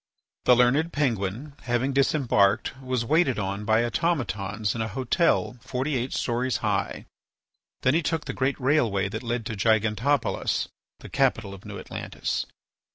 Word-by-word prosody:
The 125 - +7
learned 135 +7 +3
Penguin, 125 - -1
having 125 +2 0
disembarked, 120 -7 +2
was 130 -3 -1
waited 155 -1 +3
on 100 +1 -3
by 110 +2 +3
automatons 110 - -1
in 115 - -3
a 110 - -1
hotel 130 - +1
forty 130 +3 -2
eight 125 +1 -1
stories 125 +1 0
high. - - -1 0.8
Then 130 - +4
he 165 - +3
took 160 0 -1
the - - -4
great 135 +1 0
railway 120 -8 +2
that 110 +3 -4
led 120 -2 -2
to 110 -2 -4
Gigantopolis, 110 +6 +1 0.3
the - - -10
capital 120 -7 +1
of 95 - -12
New - - -7
Atlantis. - - -4
125 Hz, 150 wpm, -26 LUFS, 110-140 Hz, 0.8 s, The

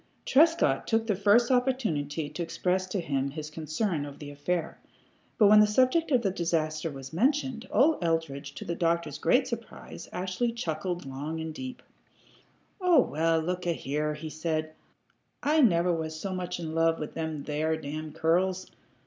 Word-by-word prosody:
Trescott 305 - +3
took 225 0 +1
the 210 -3 +1
first 210 +6 +4
opportunity 215 - 0
to 175 - -6
express 180 +3 -1
to 190 +1 -2
him 140 -5 -1
his 155 +1 -7
concern 155 +2 -2
over 145 -1 -8
the 145 -1 -8
affair, 160 +3 -3 0.6
but 215 - +6
when 210 +1 +8
the 210 - +6
subject 255 +9 +3
of 255 -4 +3
the 195 - +1
disaster 165 -3 -1
was 135 -1 -9
mentioned, 260 - 0
old 295 - +3
Eldridge, 150 -4 -2
to - - -7
the 170 - -2
doctor's 170 -3 -1
great - - +3
surprise, - - -8
actually 190 +6 -2
chuckled 175 -5 -3
long 145 +4 -5
and 160 0 -4
deeply. 255 +8 -8 1.0
"Oh, 355 -4 +5
well, 165 -3 +1
look 180 +2 -3
a 170 - +2
here," 150 +1 -2
he 155 +1 -7
said. 155 0 -2 0.7
"I 305 +2 +4
never 175 -7 +4
was 160 -1 -4
so 195 +1 -4
much 180 -1 -4
in 160 -2 -5
love 165 0 +2
with 150 - -6
them 160 -3 -4
there 155 +2 -1
damn 155 +1 -6
curls. 180 +4 0
165 Hz, 170 wpm, -28 LUFS, 155-210 Hz, 1.0 s, when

